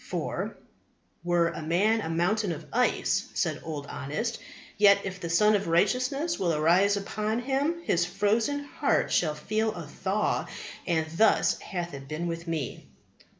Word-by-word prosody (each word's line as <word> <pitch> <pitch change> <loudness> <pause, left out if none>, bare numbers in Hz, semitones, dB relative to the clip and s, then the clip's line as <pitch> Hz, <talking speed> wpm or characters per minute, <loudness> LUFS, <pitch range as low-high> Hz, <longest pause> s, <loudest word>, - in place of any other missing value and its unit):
For, - - -3 0.7
"were 175 -1 +2
a - - -6
man 200 +8 +2
a 160 - -4
mountain 180 +5 +1
of 150 - -8
ice," - - +1
said - - -1
Old 150 -3 -5
Honest, 205 +13 -4 0.4
"yet 205 -1 +6
if 190 -1 -5
the 170 - -5
Sun 210 +6 +4
of 200 -3 +1
Righteousness 255 - +1
will 170 -4 +1
arise 180 +7 +4
upon 215 +2 -2
him 275 +7 -1
his 175 - +2
frozen 215 +10 0
heart 285 - 0
shall 155 -3 +2
feel 215 +8 -1
a 170 -3 -6
thaw; 190 +7 -1 0.4
and 160 -3 +1
thus 220 +1 +4
hath 175 -4 -5
it 135 -1 -8
been 155 +4 -4
with 170 0 -4
me." 155 -7 -4
190 Hz, 155 wpm, -28 LUFS, 165-220 Hz, 0.7 s, yet